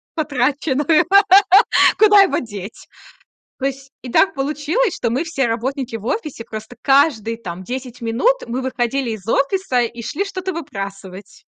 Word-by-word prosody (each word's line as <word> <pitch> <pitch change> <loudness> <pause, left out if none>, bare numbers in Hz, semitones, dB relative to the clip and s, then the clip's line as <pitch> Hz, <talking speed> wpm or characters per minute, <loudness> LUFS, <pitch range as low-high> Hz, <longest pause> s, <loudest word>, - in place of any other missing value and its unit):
потраченную. 290 +2 +1 0.9
Куда 415 -2 +7
его 390 - +2
деть? 205 -3 -9 0.7
То 265 - -3
есть 270 0 -5
и 250 - -8
так 390 - +3
получилось, 300 - -1
что 235 - -2
мы 260 +8 -1
все 300 -6 -1
работники 245 +1 -3
в 215 - -12
офисе, 300 - -4
просто 220 +1 -9
каждые, 270 -6 +2
там, 185 -4 -8
10 250 +2 -7
минут 235 - +1
мы 250 +3 -3
выходили 255 -1 -2
из 210 -2 -8
офиса 275 +1 +1
и 235 0 -4
шли 360 - -3
что-то 380 -1 -5
выбрасывать. 195 - -8
260 Hz, 145 wpm, -19 LUFS, 230-305 Hz, 0.9 s, Куда